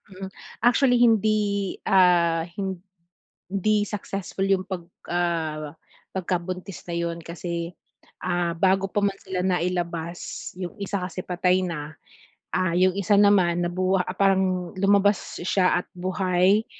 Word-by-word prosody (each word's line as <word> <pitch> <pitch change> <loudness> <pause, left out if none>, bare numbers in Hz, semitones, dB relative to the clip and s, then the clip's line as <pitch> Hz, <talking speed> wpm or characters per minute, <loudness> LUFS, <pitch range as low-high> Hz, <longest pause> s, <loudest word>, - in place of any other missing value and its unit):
Hmm. 190 0 -8 0.4
Actually 245 +1 +4
hindi 215 -4 +2
ah, 175 -3 +4 0.9
hindi 205 +3 -1
successful 195 -2 -3
'yung 195 -1 +2
'pag 185 -3 -6 0.2
ah, 160 -4 -1 0.4
pagkabuntis 180 -2 -4
na 170 - -4
'yun 170 0 -2
kasi, 170 0 -5 0.5
ah, 175 -1 0
bago 190 +2 +2
pa 205 +1 -1
man 200 -1 0
sila 190 -1 -4
nailabas, 175 -2 -2
'yung 180 -1 -7
isa 200 -1 -3
kasi 180 0 -5
patay 180 +1 +1
na, 155 -3 -5 0.6
ah, 180 -2 +1
'yung 185 +1 +4
isa 200 +1 +2
naman 185 -4 +4
nabu 185 +2 +1
ah, 180 - +1
parang 190 -2 +1
lumabas 200 +1 +2
siya 180 0 +2
at - - -38
buhay 185 +2 +2
185 Hz, 125 wpm, -25 LUFS, 175-195 Hz, 0.9 s, Actually